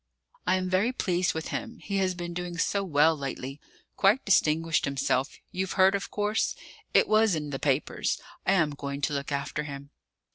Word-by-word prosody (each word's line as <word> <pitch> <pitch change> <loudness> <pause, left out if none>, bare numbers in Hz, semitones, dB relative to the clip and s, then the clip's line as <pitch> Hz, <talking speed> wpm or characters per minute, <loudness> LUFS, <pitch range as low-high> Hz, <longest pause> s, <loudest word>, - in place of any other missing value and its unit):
I - - +4
am 185 0 -1
very 190 +6 +2
pleased 180 -8 0
with 160 - -4
him; 230 - -4
he 200 -2 -3
has 185 -1 +1
been 175 -1 -5
doing 175 0 -4
so 200 +4 +1
well 160 -2 +4
lately: 135 0 -5 0.3
quite 205 +7 +3
distinguished 165 -4 +3
himself; 135 0 0
you've 190 0 -2
heard, 190 0 +5
of 200 -1 -2
course? 210 +1 0 0.4
It - - +4
was 215 -3 +4
in 150 -2 -4
the 135 - -3
papers. 140 -1 0 0.2
I 195 - +3
am 160 -6 +3
going 140 0 -5
to 145 - 0
look 140 0 -3
after 140 +1 -2
him." 140 0 -8
170 Hz, 185 wpm, -28 LUFS, 145-195 Hz, 0.4 s, heard